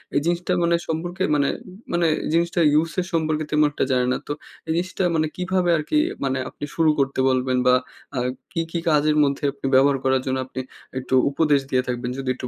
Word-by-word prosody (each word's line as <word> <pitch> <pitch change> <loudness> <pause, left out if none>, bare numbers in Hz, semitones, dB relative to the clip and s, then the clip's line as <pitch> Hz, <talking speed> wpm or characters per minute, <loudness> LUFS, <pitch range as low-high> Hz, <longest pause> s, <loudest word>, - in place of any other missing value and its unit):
এই - - +5
জিনিসটা 175 +1 0
মানে 170 0 +3
সম্পর্কে 175 +4 -2
মানে 140 -1 +2 0.5
মানে 170 -1 +2 0.3
জিনিসটা 170 +1 +1
ইউজের 165 +4 +1
সম্পর্কে 155 -1 0
তেমন 150 0 +4
একটা - - -1
জানে 125 -1 +2
না। - - +1
তো - - -3 0.4
এই - - -1
জিনিসটা 185 +2 -1
মানে 155 -1 +2
কিভাবে 180 -1 0
আরকি 155 - -3 0.3
মানে 135 0 0
আপনি - - -7
শুরু 165 -1 +3
করতে 135 -1 0
বলবেন 130 0 +1
বা 125 - +6 0.4
আ - - -2 0.3
কী, 165 - -1
কী 170 - -1
কাজের 150 0 +3
মধ্যে 140 +1 -1
আপনি 140 0 -10
ব্যবহার 135 +1 +5
করার 130 -1 +2
জন্য 130 0 0
আপনি 130 - -7 0.4
একটু 130 0 -4 0.2
উপদেশ 145 -1 +3
দিয়ে 130 -1 +2
থাকবেন? 125 0 -2
যদি 130 - -3
একটু 125 - -5
150 Hz, 195 wpm, -23 LUFS, 130-170 Hz, 0.5 s, বা